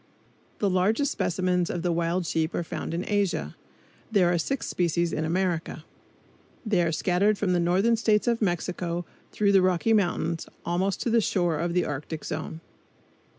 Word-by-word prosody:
The 205 - +1
largest 200 +9 +2
of - - -4
specimens 180 0 0
of 175 0 -3
wild 170 +1 0
sheep 160 0 -1
are - - -1
found 165 - -5
in 175 - -3
Asia. 195 - 0 0.6
There 180 -5 +3
are 170 - +1
six 270 - -2
species 170 -1 0
in 155 - -1
America. 165 -2 -1 0.8
They 205 -5 +2
are 170 -1 +1
scattered 190 +5 +2
from 195 -3 0
the 175 - +2
northern 190 +7 +3
states 215 -2 +2
of 235 -1 +1
Mexico 175 -2 -1 0.3
through 205 -1 +2
the 195 -1 +5
Rocky 185 +4 +2
Mountains, 175 -5 0 0.2
almost 185 +3 0
to 235 - 0
the 230 0 +4
shore 175 -6 0
of 170 0 -1
the 180 - +2
Arctic 150 +2 -5
zone. 160 +1 -5
180 Hz, 170 wpm, -26 LUFS, 170-200 Hz, 0.8 s, the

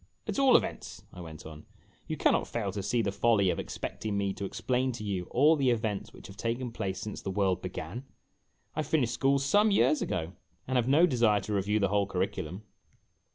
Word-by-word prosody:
"At - - -2
all 270 -2 +7
events," - - -5
I 90 - -9
went 80 -2 -10
on, 80 -1 -11 0.4
"you - - -3
can - - +3
not - - 0
fail 105 -5 -2
to 100 +1 -4
see 115 +4 0
the 100 - 0
folly 100 -3 +3
of - - -3
expecting 105 -2 -4
me 100 -1 0
to 100 - -5
explain 130 +6 -1
to 115 - -7
you 95 -4 -2
all 150 - +4
the 135 -4 +2
events 110 -4 -1
which - - -14
have 95 +1 -11
taken 120 +2 -2
place 95 -5 -3
since 105 +1 -6
the - - -4
world 95 -2 0
began. 95 +7 -6 0.7
I 155 - 0
finished 140 -6 0
school 135 +1 +2
some 205 +11 +3
years 195 -6 +3
ago, 85 0 -2 0.3
and 130 - -2
have 120 -1 +1
no 150 +6 +6
desire 115 - +2
to 105 - -4
review 105 +2 +1
the 100 -2 +1
whole 100 0 +1
curriculum." 95 -1 -3
105 Hz, 210 wpm, -29 LUFS, 95-125 Hz, 0.7 s, all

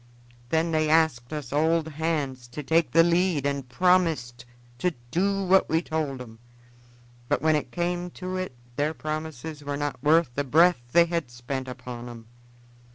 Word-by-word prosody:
Then 165 +2 +1
they 155 -1 +1
asked 155 -7 +2
us 150 -4 -5
old 160 +2 +2
hands 145 -5 -2
to 135 +5 -7
take 165 +3 +2
the 165 +1 +5
lead 170 -3 +2
and 140 -3 -2
promised 155 -7 +1 0.3
to 180 0 0 0.2
do 195 +3 +1
what 190 +1 +4
we 165 +2 +1
told 155 -5 -2
'em, 115 -3 -11 0.9
but - - +2
when 155 0 +4
it 150 - -2
came 175 0 -2
to 185 0 -4
it 185 -8 -4 0.2
their 150 +2 0
promises 155 -1 -5
were 145 0 -3
not 145 -4 -3
worth 155 0 +4
the 145 - -1
breath 160 +2 +4
they 170 +4 +6
had 170 -5 -2
spent 130 +2 -5
upon 125 -1 -7
'em. 115 -1 -10
155 Hz, 165 wpm, -26 LUFS, 130-170 Hz, 0.9 s, they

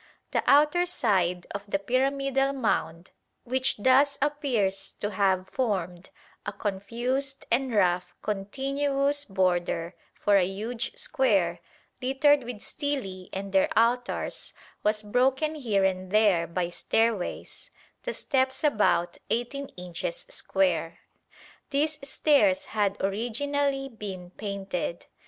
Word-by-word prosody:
The - - +1
outer 300 +5 +5
side 180 - +1
of 200 0 -5
the 200 - +1
pyramidal 270 +5 +1
mound, 190 -9 -1 0.3
which 260 +1 +1
thus 265 +6 +4
appears 245 -10 0
to 205 - -2
have 190 -2 +1
formed 190 -7 -2 0.3
a - - -3
confused 245 +7 -3
and 260 +2 +2
rough 180 -4 +1
continuous 275 +7 -1
border 175 -3 0 0.2
for 205 -1 +3
a 190 - +4
huge 225 - -4
square, - - +2 0.4
littered 270 +1 +3
with 235 -3 -7
stelae 235 -11 -4
and 195 0 -5
their 190 - +4
altars, 240 +2 0 0.3
was 210 0 +1
broken 260 +8 +2
here 220 -10 +1
and 185 -1 -1
there 200 -5 +3
by 175 0 -2
stairways, 225 +1 -1 0.3
the - - -3
steps 260 +2 0
about 210 - +2
18 275 +4 -2
inches 175 -1 -5
square. 175 -4 0 0.7
These 290 0 -1
stairs 290 0 +3
had 205 -2 +1
originally 270 +7 -1
been 195 -7 -7
painted. 195 -4 -4
225 Hz, 115 wpm, -27 LUFS, 190-275 Hz, 0.7 s, outer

